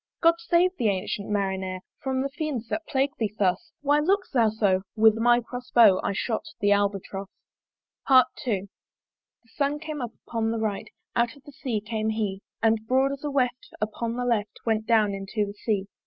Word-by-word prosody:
"God 335 0 +6
save 345 +2 +2
thee, 230 - +1
ancyent 200 +1 -2
Marinere! 190 -2 -1 0.2
"From 265 -1 -1
the 275 - -2
fiends 280 -6 -4
that 320 - -3
plague 275 0 +1
thee 215 -2 -1
thus 205 - 0
"Why 290 +1 +3
look'st 385 +5 +1
thou 230 -4 +4
so?" 205 -3 +2
with 220 -1 +6
my 240 +1 +4
cross 245 +2 -8
bow 215 -6 +6
I - - 0
shot 220 +3 -1 0.2
the 205 0 +2
Albatross. 200 -1 0 0.8
II. 260 -1 +8 1.2
The 230 - -28
Sun 285 0 +1
came 305 -1 -5
up 240 -2 -4
upon 225 -1 -1
the 230 - -1
right, 215 -3 -2 0.3
Out 235 +1 +1
of 280 - -19
the 290 - -12
Sea 250 -6 -3
came 220 0 -2
he; 210 -3 -2 0.2
And 220 -1 +2
broad 265 +2 +3
as 275 0 -6
a 295 - -1
weft 255 -3 -1
upon 225 +2 -2
the 245 0 -2
left 220 -4 -1
Went 220 -1 0
down 215 -3 +3
into 195 +2 -2
the 200 - -7
Sea. 205 -2 -1
225 Hz, 190 wpm, -26 LUFS, 205-270 Hz, 1.2 s, II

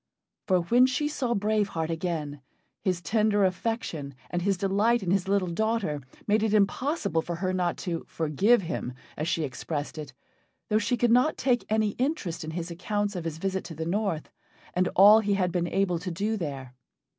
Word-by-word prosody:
For 185 -2 +3
when 240 +9 +4
she 265 +3 0
saw 255 -5 -1
Brave 210 0 +1
Heart 165 -4 -3
again, 160 -4 -3 0.4
his 180 -2 -1
tender 210 +2 +2
affection 185 - -2 0.2
and 175 - -1
his 195 +1 +1
delight 200 +4 +2
in 175 - -1
his 195 -1 +1
little 195 -2 +2
daughter 215 -6 -1 0.2
made 215 +1 +2
it 215 -1 +2
impossible 205 - +1
for 170 +1 -4
her 185 +2 -1
not 180 -2 0
to 170 -3 -2
"forgive 190 - +2
him," 165 -7 -4 0.2
as 155 - -3
she 165 -1 0
expressed 145 +3 -4
it, 150 -3 -7 0.6
though 215 0 +3
she 245 +3 0
could 240 0 +2
not 250 +6 +4
take 245 -3 +1
any 215 -1 +2
interest 255 - -1
in 155 - -5
his 170 +1 -4
accounts 205 +3 -2
of 175 -2 -4
his 160 -1 -3
visit 190 +2 -2
to 165 - -8
the 160 +1 -4
north 185 -3 -1 0.4
and 180 0 +2
all 205 +3 +8
he 205 -2 +1
had 180 -2 +1
been 175 -1 0
able 180 -2 0
to 180 +2 -5
do 205 +6 -1
there. 140 -9 -5
190 Hz, 190 wpm, -27 LUFS, 165-215 Hz, 0.6 s, all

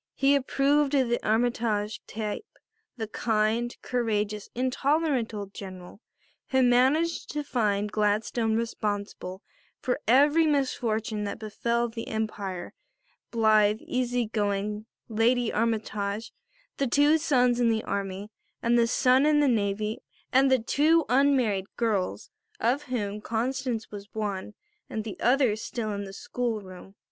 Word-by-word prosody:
He 275 +1 +3
approved 280 +1 +2
of 260 -3 +2
the 240 - 0
Armytage 220 -2 0
type 215 - -4 0.5
the 225 - -2
kind, 220 +2 0
courageous, 215 -4 -1
intolerant 265 0 +1
old 205 -2 -6
General 185 +1 -9 0.5
who 260 -1 +3
managed 265 +7 +3
to 295 0 -2
find 210 -6 0
Gladstone 220 +2 +1
responsible 205 -4 -3 0.4
for 255 +2 -1
every 290 +7 +5
misfortune 225 -7 0
that 200 - -4
befell 235 +2 -1
the 230 0 -7
Empire 200 -5 -4 0.6
blithe, 215 -2 +4
easy 245 -1 -1
going 210 0 -2 0.2
Lady 235 +2 +2
Armytage, 215 -1 -2 0.4
the 275 - +1
two 290 +5 +4
sons 250 -6 +2
in 240 -1 +3
the 220 -1 0
army 200 +1 -4 0.3
and 235 +1 +2
the 230 - +4
son 255 +3 +4
in 300 -1 +4
the 290 - +4
navy 215 -2 0 0.3
and 265 +1 +5
the 260 - +6
two 305 +7 +3
unmarried 250 -8 +2
girls, 215 -6 -1 0.3
of 280 -1 +1
whom 210 -5 -3
Constance 235 +1 -2
was 205 0 -9
one 210 -1 -3 0.3
and 220 - -3
the 215 -2 -7
other 245 -2 +3
still 215 0 -4
in 200 0 -4
the 195 - -8
school 235 +2 -3
room. 190 0 -12
225 Hz, 135 wpm, -27 LUFS, 210-255 Hz, 0.6 s, the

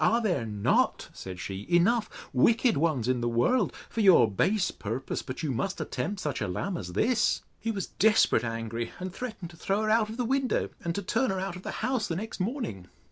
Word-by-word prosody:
Are 230 +2 +4
there 175 - 0
not, 105 -1 +1
said 90 -1 -8
she, 95 +2 -5
enough 215 +6 +3 0.2
wicked 225 - +4
ones 145 -7 +1
in 130 -1 +1
the 120 - 0
world, 180 - +2 0.2
for 225 - -2
your 185 - +7
base 195 - +1
purpose, 115 +5 -4
but 130 +6 -6
you 150 - 0
must 185 +11 -2
attempt 160 +6 -3
such 150 -3 -2
a 105 - 0
lamb 175 - -2
as 90 - -6
this? 230 - +2 0.2
He 225 - -3
was 200 -4 -2
desperate 220 - +3
angry, 115 0 -3
and 185 0 -5
threatened 205 -7 -6
to 170 - -15
throw 195 +5 0
her 215 - +1
out 220 -1 +3
of 220 - -7
the 250 - 0
window; 265 +1 +1
and 170 -1 -2
to 200 - -2
turn 235 +7 +1
her 190 -1 -1
out 190 -1 -3
of 180 - -8
the - - -6 0.2
house 255 -4 0
the 165 - -2
next 215 +5 -5
morning. 185 - -3
185 Hz, 220 wpm, -28 LUFS, -, 0.2 s, your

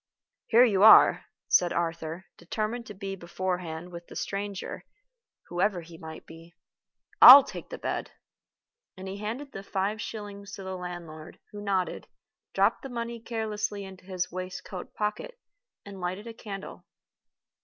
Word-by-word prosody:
"Here 235 +2 +6
you 200 -5 +1
are," 220 +1 +8 0.2
said 175 -1 +4
Arthur, 165 +1 -3
determined 220 +5 -4
to 210 - -9
be 195 0 -5
beforehand 180 -1 -4
with 170 0 -9
the - - -12
stranger, 200 -1 -4 0.7
whoever 180 +1 0
he 165 0 -13
might 160 -1 -9
be. 165 +1 -14 0.7
"I'll 270 +2 +13
take - - -9
the - - -6
bed." - - -3 0.9
And 190 +1 -8
he 190 +1 -5
handed 235 +7 -5
the 195 - -7
five 200 +2 -2
shillings 205 -2 -7
to 195 - -7
the 190 0 -5
landlord, 175 -3 -8
who 205 - -8
nodded, 195 -3 -1 0.5
dropped - - +3
the 270 - -7
money 235 -1 -4
carelessly 215 -3 -3
into 190 -1 -12
his 185 -2 -3
waistcoat 185 +1 -7
pocket, 350 - -3 0.5
and 195 -2 -9
lighted 185 +4 -4
a 230 - -7
candle. 200 -4 -9
195 Hz, 145 wpm, -28 LUFS, 180-215 Hz, 0.9 s, I'll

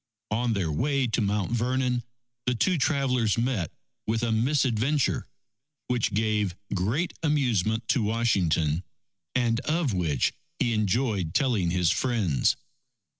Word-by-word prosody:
On 115 +2 +1
their 95 -6 -1
way 135 - +1
to 115 0 0
Mount 105 0 0
Vernon, 125 +1 0 0.5
the 125 - +2
two 175 +8 +1
travellers 130 -7 +1
met 115 -8 0 0.4
with 110 +1 0
a 115 - +1
misadventure, 130 +2 +1 0.6
which 120 -5 0
gave 105 -4 +1 0.2
great 110 - 0
amusement 115 - +1
to 130 - +3
Washington, 95 -8 +1 0.5
and 120 -2 +2
of 150 -3 0
which 80 -7 +1 0.2
he 120 - +1
enjoyed 105 -4 0
telling 120 - +2
his 90 -1 +2
friends. 95 - +1
115 Hz, 125 wpm, -27 LUFS, 100-130 Hz, 0.6 s, to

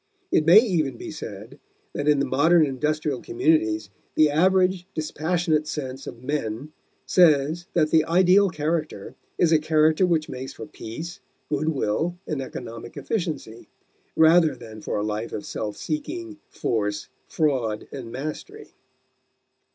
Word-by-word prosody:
It 155 - +2
may 175 +5 +9
even 165 - 0
be - - -7
said 115 -3 -9 0.3
that 145 - -3
in 150 -1 +5
the 140 - +1
modern 155 +5 +4
industrial 150 0 -1
communities 110 -7 +1 0.2
the 155 -1 +5
average, 185 +3 +2
dispassionate 155 0 0
sense 135 -3 -5
of 120 - -9
men 135 -1 -3 0.3
says 160 -1 +3
that 155 -3 +2
the 160 -1 +5
ideal 185 +4 +4
character 155 - -3 0.2
is 170 - +3
a 160 - +5
character 155 +3 +3
which 160 -3 +1
makes 130 +1 -7
for 110 - -8
peace, 160 - -8 0.3
good 150 +1 0
will, 160 +5 -1
and 150 -3 -3
economic 120 -3 -8
efficiency, 155 - -4 0.5
rather 160 -2 +5
than 110 -3 -11
for - - -3
a 105 - -1
life 110 +2 -3
of 105 - -5
self 105 -1 -4
seeking, 315 +1 -5
force, 105 -2 -2 0.2
fraud, 130 -9 -1
and 125 -5 -7
mastery. 155 - -7
155 Hz, 140 wpm, -24 LUFS, 125-170 Hz, 0.5 s, may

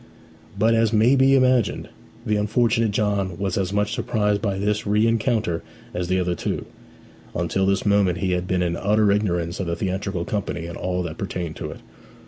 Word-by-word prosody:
But, 110 +3 +3
as 115 -1 +3
may 115 +4 +4
be 135 0 +5
imagined, 130 -3 +2 0.4
the 105 -3 +1
unfortunate 115 +2 +2
John 100 -3 -1
was 95 -2 -2
as 95 -1 -1
much 105 0 0
surprised 105 -2 0
by 100 -3 -1
this 105 +1 -1
rencounter 110 -3 +1 0.3
as 90 0 -2
the 95 +1 +1
other 90 -1 0
two. 85 - -3 0.7
Until 90 +3 0
this 100 0 +1
moment 100 -3 +3
he 95 +2 -1
had 90 0 -1
been 90 -1 +1
in 85 -1 -1
utter 105 +2 +2
ignorance 90 -4 0
of 95 - -2
the 85 - -1
theatrical 95 -2 -2
company 100 -5 -3
and 85 0 -7
all 90 0 -2
that 80 -2 -6
pertained 90 -4 -4
to - - -5
it. - - -10
100 Hz, 185 wpm, -23 LUFS, 90-105 Hz, 0.7 s, be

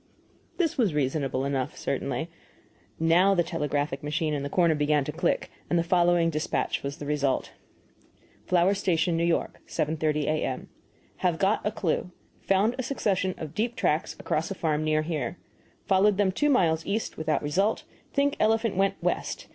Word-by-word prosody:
This 330 -6 0
was 200 -11 +2
reasonable 135 -2 0
enough, 135 -2 -2
certainly. - - -2 0.7
Now 175 +5 +4
the 175 - +3
telegraphic 150 -4 -2
machine 150 +1 -1
in 145 - -1
the 140 - -3
corner 170 0 +3
began 150 -1 +2
to 150 - -4
click, 170 +3 -1 0.2
and 175 - +2
the 170 - +2
following 175 -1 +3
despatch 155 0 -1
was 140 +1 -5
the 145 - -7
result: 145 -2 0 1.0
FLOWER 180 +2 +4
STATION, 170 -3 +1
N. 170 - +2
Y., 170 - +1 0.2
7.30 155 -1 0
A.M. 145 -3 -2 0.5
Have 175 -3 +1
got 195 +4 +1
a 210 - 0
clue. 180 -4 -1 0.3
Found 195 +4 +2
a - - 0
succession 195 -8 0
of 155 -2 -7
deep 235 +3 -1
tracks 150 +1 0
across 155 +1 -1
a 195 - -4
farm 155 -3 0
near 155 0 +1
here. 155 -2 -3 0.5
Followed 195 0 +3
them 200 -2 +3
two 295 +10 +1
miles 165 - +3
east 215 +3 -2
without 155 -1 -1
result; 195 +9 +1 0.3
think 280 0 +1
elephant 225 -1 +2
went 195 +1 +2
west. - - -2
165 Hz, 165 wpm, -27 LUFS, 150-195 Hz, 1.0 s, Now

